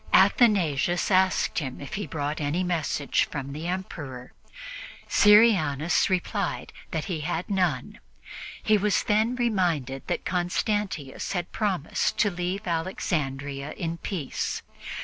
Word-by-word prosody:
Athanasius 175 - +4
asked 185 -1 +3
him 130 -5 -5
if 140 - -8
he 205 0 -3
brought 150 0 -3
any 150 +5 0
message 165 -5 0
from 140 -2 -5
the 155 +3 -5
Emperor; 145 -9 -5 0.8
Syrianus 195 - +5
replied 190 +2 -1 0.2
that 160 -2 -2
he 180 -5 -3
had 165 +3 -2
none. 180 -10 0 0.6
He 215 -1 +4
was 205 0 +2
then 220 +4 +2
reminded 175 - 0
that - - -2
Constantius 180 - -1
had 175 -2 -3
promised 190 -8 0
to 205 - +3
leave 180 +3 -3
Alexandria 145 -5 -2
in 165 -1 -4
peace. 165 -9 -3
175 Hz, 120 wpm, -26 LUFS, 145-195 Hz, 0.8 s, Syrianus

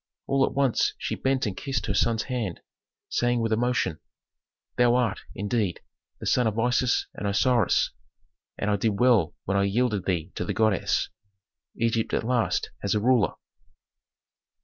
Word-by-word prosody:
All 135 0 +2
at - - -5
once 135 -4 +2
she - - -3
bent 130 -1 0
and 100 -4 -3
kissed 135 0 -3
her 105 - -1
son's 110 +2 +1
hand, 120 -9 -3 0.5
saying 120 0 +1
with 115 -1 0
emotion, 120 -8 0 0.8
"Thou 120 0 +4
art, 120 -5 +1 0.2
indeed, 100 -2 -1 0.4
the - - -7
son 125 -2 +3
of 110 0 -2
Isis 125 +2 +2
and 105 - -4
Osiris, 120 +3 +2 0.7
and 105 - -1
I 100 - +2
did 105 0 0
well 120 -10 +3
when 100 +1 0
I 100 - +3
yielded 105 -1 0
thee 85 -4 -1
to - - -3
the - - -3
goddess. 110 -4 +1 0.7
Egypt 115 -1 0
at - - -1
last 120 -1 0
has 100 +2 0
a - - +2
ruler." 115 -4 +3
115 Hz, 160 wpm, -26 LUFS, 100-125 Hz, 0.8 s, Thou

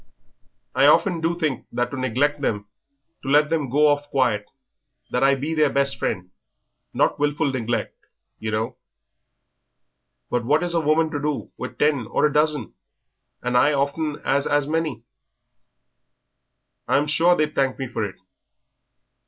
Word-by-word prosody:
I - - +4
often 180 -5 +4
do 165 +1 0
think 155 -6 -2
that 120 0 -1
to - - -4
neglect 135 +3 0
them, 105 -6 -1 0.6
to 135 - -5
let 150 +2 +4
them 155 -5 0
go 150 +4 +4
off 145 0 +1
quiet, 120 -7 +1 0.6
that 125 - +1
I 140 0 +5
be 145 +4 -3
their 155 -2 +3
best 140 0 0
friend; 90 -2 -3 0.6
not - - +1
wilful 145 0 +1
neglect, 120 -2 -2 0.4
yer 110 - -4
know, 110 +1 -2 1.5
but 120 -1 0
what 150 +7 +2
is 175 -1 -2
a 165 - +2
woman 155 +1 +2
to 145 - -2
do 150 -1 -3
with 125 - -7
ten 145 -7 +1
or 120 - +1
a 150 - +1
dozen, 150 -5 +1 0.7
and 125 0 -1
I 145 +4 +4
often 145 +2 -1
'as 140 +1 +1
as 145 -1 +2
many? 155 -7 -2 1.8
I - - +3
am 145 - +1
sure 165 +4 +3
they'd 155 -2 0
thank 135 -1 0
me 135 - -4
for 110 - -3
it." 100 -2 -4
145 Hz, 160 wpm, -23 LUFS, 125-150 Hz, 1.8 s, I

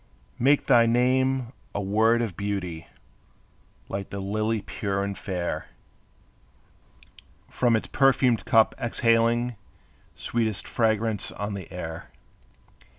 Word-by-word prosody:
Make 140 +4 +3
thy 115 -1 +5
name 130 +1 +1 0.2
a - - 0
word 110 +4 +2
of 105 -7 -4
beauty, 90 -5 -4 1.0
Like 100 0 -5
the 100 - -5
lily 110 +2 -1
pure 100 -1 -2
and 100 0 -3
fair, 90 -3 -4 1.8
From 120 -2 +2
its 110 - -1
perfumed 130 -3 +3
cup 110 -1 +4
exhaling 115 0 +1 0.6
Sweetest 110 -4 -2
fragrance 110 -2 0
on 100 +1 -4
the 95 -4 -7
air. 80 -3 -7
110 Hz, 105 wpm, -26 LUFS, 100-120 Hz, 1.8 s, thy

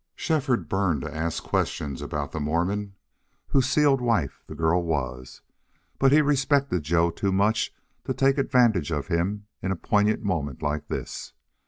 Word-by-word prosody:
Shefford 145 -7 0
burned 95 -7 0
to 75 0 -6
ask 80 +1 -2
questions 70 -3 -2
about 75 -2 -4
the 80 - -4
Mormon 90 +7 -1 0.5
whose 135 -1 +2
sealed 140 -2 +3
wife 115 - 0
the - - -8
girl 80 +2 +2
was, 65 -6 -3 0.6
but 135 0 +5
he 150 +2 +6
respected 140 - +2
Joe 85 +3 +2
too 95 +3 -1
much 105 +4 +2 0.3
to - - -1
take 135 +1 +3
advantage 120 - +3
of 75 -4 -2
him 100 +5 -1 0.2
in 95 - -1
a - - 0
poignant 105 +5 +1
moment 75 - -2
like 75 0 -2
this. - - -5
95 Hz, 160 wpm, -25 LUFS, 80-125 Hz, 0.6 s, he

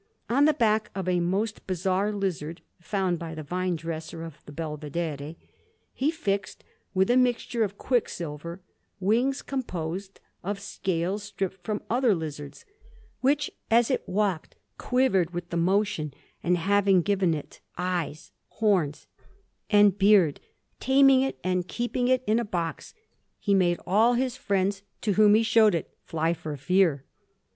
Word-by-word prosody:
On 280 +4 +5
the 310 - +5
back 220 -2 +2
of 190 -2 -3
a 180 -1 +2
most 195 +5 -1
bizarre 190 +2 0
lizard, 180 -5 -3 0.2
found 185 -2 -1
by 165 -1 -6
the 155 - -6
vine 180 +4 -1
dresser 165 0 -6
of 165 -3 -10
the - - -9
Belvedere, 150 0 -4 0.6
he 275 +3 +1
fixed, 200 -11 -2 0.3
with 190 +4 +3
a - - +4
mixture 245 -2 +2
of 200 -1 -3
quicksilver, 170 - -2 0.4
wings 240 +8 +1
composed 190 - -4 0.2
of 200 +2 -3
scales 190 -1 -2
stripped 195 -2 -5
from 210 +2 -3
other 240 -3 +3
lizards, 145 -3 -7 0.5
which, 290 +3 +1 0.2
as 235 +2 +4
it 260 - +1
walked, 190 -4 -1 0.2
quivered 195 -10 +1
with 175 0 -5
the - - -2
motion; 170 -5 0 0.3
and 180 +1 +2
having 195 0 +3
given 190 -4 +2
it 150 - -9 0.2
eyes, 175 -4 -3 0.2
horns, 185 -10 0 0.6
and 205 -2 +5
beard, 195 -7 +5 0.4
taming 270 0 +5
it, 270 - -1
and 180 -1 0
keeping 245 +2 -1
it 255 0 +2
in 220 +2 +2
a - - 0
box, 175 -6 -4 0.4
he 200 - 0
made 175 -3 +3
all 225 +6 +4
his 255 0 0
friends, 200 -4 0 0.2
to 215 - 0
whom 210 +1 +6
he 225 - +4
showed 220 -3 +5
it, 165 - -4
fly 165 +1 0
for 155 -3 -6
fear. 160 -2 +2
190 Hz, 150 wpm, -27 LUFS, 170-220 Hz, 0.6 s, whom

